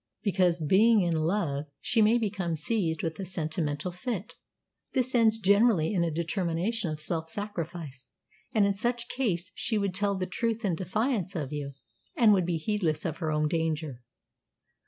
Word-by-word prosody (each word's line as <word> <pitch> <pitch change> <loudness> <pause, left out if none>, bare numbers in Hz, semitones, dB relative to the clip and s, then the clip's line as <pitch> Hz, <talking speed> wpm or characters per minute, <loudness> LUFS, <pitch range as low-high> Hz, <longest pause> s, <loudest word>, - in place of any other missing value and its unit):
"Because, 185 -5 +2
being 200 +8 +4
in 170 -2 +1
love, 155 -3 0
she 225 - +2
may 220 +3 +5
become 195 -7 -1
seized 160 -1 -1
with 160 +1 -3
a - - -3
sentimental 160 -2 -2
fit. 210 +2 -4 0.6
This 255 -1 +1
ends 225 -2 +4
generally 200 -4 +3
in 175 -4 +2
a 170 - +1
determination 170 +5 -1
of 155 -1 -4
self 160 +1 0
sacrifice; 165 -9 -6 0.4
and 215 -3 +3
in 200 - +2
such 235 +3 -2
case 190 -8 -1
she 220 +3 -1
would 200 -2 0
tell 200 +1 0
the 185 - -1
truth 225 +4 -2
in 190 - +1
defiance 195 +3 -1
of 150 -3 -3
you, 140 -2 -4 0.4
and 225 -3 +6
would 185 -3 +2
be 170 -2 0
heedless 170 -2 -1
of 160 -2 -2
her 160 -3 -1
own 150 0 +1
danger." 155 -5 -2
180 Hz, 170 wpm, -28 LUFS, 160-210 Hz, 0.6 s, and